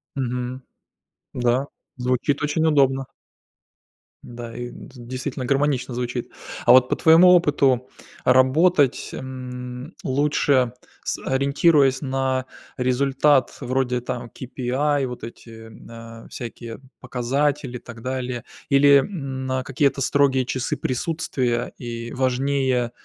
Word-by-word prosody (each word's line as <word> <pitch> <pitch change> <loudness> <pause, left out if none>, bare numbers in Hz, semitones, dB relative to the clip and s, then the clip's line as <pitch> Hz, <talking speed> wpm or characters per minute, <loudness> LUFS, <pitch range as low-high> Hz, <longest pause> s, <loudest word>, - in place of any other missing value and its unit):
Мгм. 125 0 -3 0.7
Да, 125 +3 +1 0.3
звучит 125 +3 0
очень 160 +2 +1
удобно. 135 -3 +3 1.2
Да, 120 -1 -9
и 120 0 -5
д - - -12
действительно, 130 +2 -5
гармонично 135 -2 0
звучит. 125 0 -4 0.3
А - - +7
вот 130 0 +6
по - - +1
твоему 165 +3 +6
опыту 140 -7 +3 0.4
работать, 135 +3 +3
м, 125 +2 -7
лучше, 135 -2 +2 0.3
с - - -3
ориентируясь 140 0 +3
на 130 -1 -1 0.3
результат 135 +2 +2
вроде 125 -1 -1
там 125 -1 -5
KPI, 135 +2 -1
вот 125 -1 -7
эти, 115 -1 -10 0.5
э, - - -14
всякие 115 -1 -8 0.2
показатели 130 +1 -1
и - - -12
так 115 -1 -11
далее. 125 -1 -4 0.3
Или, 140 0 +6
м, 135 -6 -4
на 130 0 -1
какие-то 135 +1 0
строгие 135 -2 +2
часы 130 0 -2
присутствия 130 -4 -2
и 120 -1 -6
важнее, 130 -1 0
130 Hz, 110 wpm, -23 LUFS, 125-140 Hz, 1.2 s, А